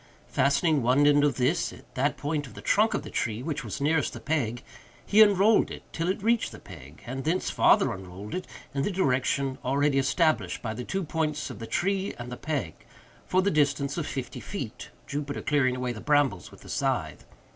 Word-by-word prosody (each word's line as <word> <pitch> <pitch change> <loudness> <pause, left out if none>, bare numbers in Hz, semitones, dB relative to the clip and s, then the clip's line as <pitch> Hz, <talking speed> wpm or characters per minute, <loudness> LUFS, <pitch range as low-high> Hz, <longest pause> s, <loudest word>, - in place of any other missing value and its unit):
Fastening 140 +2 +2
one 130 +5 +4
end 145 0 +5
of 145 -4 +2
this 135 +7 +1
at - - -15
that 135 +3 0
point 145 -1 -2
of 110 - -14
the - - -9
trunk, 215 +2 +3
of - - -2
the 150 - -9
tree 110 +1 -2
which 150 -1 -3
was - - -5
nearest 145 +1 +1
the - - -7
peg, 130 -6 -1 0.4
he 210 +2 +5
unrolled 205 +1 +5
it - - -8
till 165 +1 -2
it 190 +1 -2
reached 230 +1 +2
the - - -10
peg, 70 +4 -13
and 130 +2 -5
thence 170 +6 0
farther - - +4
unrolled 95 +2 -9
it, 185 0 -4 0.3
in 140 - -1
the 140 - 0
direction 135 -6 0
already 140 +1 +2
established 155 +4 +1
by 110 -2 -2
the 125 +3 -5
two 190 +8 -2
points 155 -1 -2
of - - -9
the 115 - -6
tree 195 +1 -1
and 120 +1 -7
the - - -4
peg, 135 - -3 0.5
for 185 0 +2
the 200 - +2
distance 140 -2 +1
of 170 -4 -3
fifty 125 -3 -5
feet—Jupiter 145 - -6
clearing 135 -4 +2
away 125 -1 -2
the 105 - -8
brambles 145 -10 +2
with - - -16
the - - -13
scythe. - - -1
145 Hz, 205 wpm, -27 LUFS, 125-160 Hz, 0.5 s, end